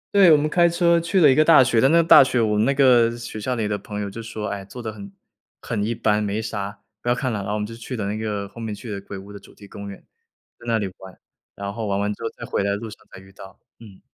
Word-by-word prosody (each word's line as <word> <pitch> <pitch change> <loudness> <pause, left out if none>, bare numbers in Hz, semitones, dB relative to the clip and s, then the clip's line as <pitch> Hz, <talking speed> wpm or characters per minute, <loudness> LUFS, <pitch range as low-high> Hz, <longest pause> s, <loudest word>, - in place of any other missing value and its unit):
对， 190 -4 +7
我 155 - +7
们 145 +1 0
开 170 +2 +3
车 170 0 +3
去 170 +3 0
了 160 - +7
一 - - +5
个 155 - +4
大 155 -4 +7
学， 120 -3 +2
但 135 - +4
那 165 - +5
个 170 - +5
大 - - +9
学 130 -2 0
我 110 -2 +1
们 105 +1 +2
那 135 - +2
个 125 -4 +5
学 115 -2 -7
校 125 +4 -2
里 110 -3 -2
的 105 -1 -2
朋 105 +1 -7
友 100 - -3
就 115 - -7
说： 110 -1 -6
“哎， 100 -1 -5
做 100 +6 -11
得 110 -3 -5
很 100 -2 -10 0.5
很 105 -3 -3
一 115 +3 -2
般， 110 -2 +1
没 105 +1 -2
啥， 100 -2 -5 0.2
不 120 - -3
要 120 - +3
看 125 -1 -2
了。” 105 - -2
然 100 - -6
后 105 - -2
我 - - -1
们 105 - -2
就 115 - -9
去 120 +2 -7
的 105 - -3
那 100 +1 -2
个 105 -2 -4
后 115 +4 -12
面 110 -2 -4
去 110 +2 -9
的 100 -1 -5
鬼 100 0 -9
屋 100 +2 -11
的 100 - -9
主 - - -19
题 100 - -14
公 100 0 -9
园， 100 - -9 0.6
在 120 - -15
那 115 -1 +2
里 105 - -2
玩， 95 -1 -13 0.4
然 100 0 -5
后 110 0 -4
玩 100 0 -1
完 105 +1 -1
之 - - -15
后， 115 - -2
在 - - -7
回 - - -2
来 100 - 0
的 100 - 0
路 110 +1 -8
上 105 - -14
再 - - -11
遇 95 0 -17
到， 95 0 -13 0.2
嗯。 105 -5 -14
110 Hz, 345 characters per minute, -22 LUFS, 100-125 Hz, 0.6 s, 大